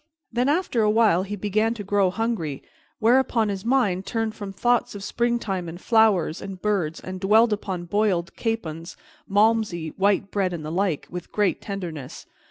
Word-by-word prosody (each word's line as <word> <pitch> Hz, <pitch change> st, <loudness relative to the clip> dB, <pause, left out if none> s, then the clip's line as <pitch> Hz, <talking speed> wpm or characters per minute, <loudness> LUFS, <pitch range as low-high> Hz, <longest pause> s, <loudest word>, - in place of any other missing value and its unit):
Then, 245 Hz, +3 st, +1 dB
after 300 Hz, -7 st, +1 dB
a 210 Hz, -, +3 dB
while, 215 Hz, -5 st, +4 dB
he 200 Hz, +2 st, -4 dB
began 215 Hz, +3 st, 0 dB
to 210 Hz, -, -6 dB
grow 200 Hz, -1 st, +2 dB
hungry, 190 Hz, -, -2 dB, 0.3 s
whereupon 235 Hz, -1 st, +3 dB
his 195 Hz, -1 st, -4 dB
mind 230 Hz, -7 st, +1 dB
turned 225 Hz, 0 st, -2 dB
from 205 Hz, -3 st, -7 dB
thoughts 240 Hz, +3 st, +1 dB
of 200 Hz, -, -7 dB
springtime 220 Hz, -7 st, -1 dB
and 170 Hz, +2 st, -8 dB
flowers 210 Hz, -7 st, +3 dB
and 195 Hz, -1 st, -7 dB
birds 180 Hz, -6 st, -1 dB
and 185 Hz, 0 st, -7 dB
dwelled 215 Hz, +4 st, +4 dB
upon 190 Hz, -4 st, -4 dB
boiled 190 Hz, -2 st, 0 dB
capons, 170 Hz, -8 st, -4 dB, 0.3 s
Malmsey, 205 Hz, -5 st, +2 dB
white 195 Hz, 0 st, +2 dB
bread, 190 Hz, -3 st, 0 dB
and 160 Hz, -3 st, -5 dB
the 155 Hz, -, -4 dB
like, 180 Hz, -3 st, 0 dB
with 180 Hz, -1 st, -7 dB
great 205 Hz, -5 st, +1 dB
tenderness. 170 Hz, -9 st, -6 dB
200 Hz, 170 wpm, -24 LUFS, 180-225 Hz, 0.3 s, while